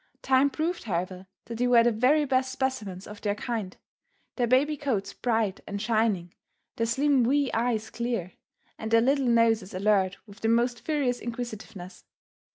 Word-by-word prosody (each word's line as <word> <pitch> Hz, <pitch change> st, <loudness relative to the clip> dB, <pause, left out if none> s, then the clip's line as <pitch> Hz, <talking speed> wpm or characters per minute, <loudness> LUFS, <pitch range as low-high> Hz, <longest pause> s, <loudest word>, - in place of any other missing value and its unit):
Time 265 Hz, +1 st, +4 dB
proved 325 Hz, +3 st, -3 dB
however 185 Hz, -1 st, -3 dB, 0.2 s
that 230 Hz, 0 st, -7 dB
they 245 Hz, -, +2 dB
were 240 Hz, -1 st, +6 dB
the 240 Hz, -, +3 dB
very 260 Hz, +7 st, +3 dB
best 260 Hz, -1 st, +1 dB
specimens 220 Hz, -9 st, -3 dB
of 210 Hz, 0 st, -10 dB
their 205 Hz, -1 st, 0 dB
kind, 220 Hz, -4 st, -4 dB, 0.6 s
their 245 Hz, -2 st, +1 dB
baby 275 Hz, +5 st, +3 dB
coats 220 Hz, -9 st, -2 dB
bright 225 Hz, -5 st, 0 dB
and 200 Hz, -, -4 dB
shining, 215 Hz, -5 st, 0 dB, 0.4 s
their 230 Hz, -, 0 dB
slim 270 Hz, +2 st, +2 dB
wee 275 Hz, +2 st, +2 dB
eyes 225 Hz, -2 st, -1 dB
clear, 235 Hz, -7 st, -3 dB, 0.5 s
and 220 Hz, -, -4 dB
their 230 Hz, 0 st, +5 dB
little 270 Hz, +2 st, +2 dB
noses 225 Hz, -5 st, +2 dB
alert 195 Hz, -1 st, +2 dB
with 205 Hz, 0 st, -15 dB
the 225 Hz, -, 0 dB
most 240 Hz, +1 st, +2 dB
furious 275 Hz, -5 st, 0 dB
inquisitiveness. 220 Hz, -6 st, -7 dB
230 Hz, 165 wpm, -27 LUFS, 205-255 Hz, 0.6 s, were